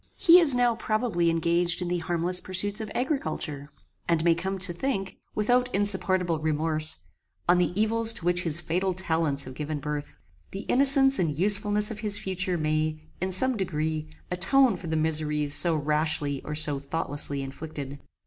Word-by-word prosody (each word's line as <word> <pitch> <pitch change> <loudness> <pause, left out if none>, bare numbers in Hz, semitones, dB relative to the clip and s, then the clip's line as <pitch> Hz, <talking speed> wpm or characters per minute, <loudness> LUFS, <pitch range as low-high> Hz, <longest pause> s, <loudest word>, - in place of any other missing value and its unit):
He 350 -1 +6
is 300 -7 +6
now 245 -1 +2
probably 215 -6 -1
engaged 170 +1 0
in 180 - -4
the 175 0 -2
harmless 175 +2 -1
pursuits 205 +3 -1
of 215 - -6
agriculture, 155 - -4 0.4
and 165 -2 +1
may 170 0 +4
come 190 +4 -4
to 185 -1 +2
think, 195 -2 -4 0.2
without 245 +4 +1
insupportable 185 -4 0
remorse, 155 0 -1 0.4
on 175 +1 +3
the 175 - 0
evils 225 +1 +2
to 170 - -7
which 175 0 +2
his 165 -2 +3
fatal 180 +2 -2
talents 160 -6 -1
have 130 - -10
given 150 +2 -5
birth. 150 0 -6 0.4
The 195 - -5
innocence 270 +2 +3
and 155 -5 -1
usefulness 205 +3 +3
of 215 - -8
his 210 -2 +1
future 185 -1 -3
life 165 -3 -3
may, 155 0 -1 0.3
in 185 +1 -2
some 255 +8 +4
degree, 155 -5 -3 0.2
atone 225 +6 +2
for 180 - -9
the 160 - -2
miseries 150 -2 +2
so 170 +1 +5
rashly 150 -1 -1
or 150 - -6
so 150 -2 +2
thoughtlessly 140 -1 +1
inflicted. 140 0 -8
175 Hz, 170 wpm, -25 LUFS, 155-205 Hz, 0.4 s, He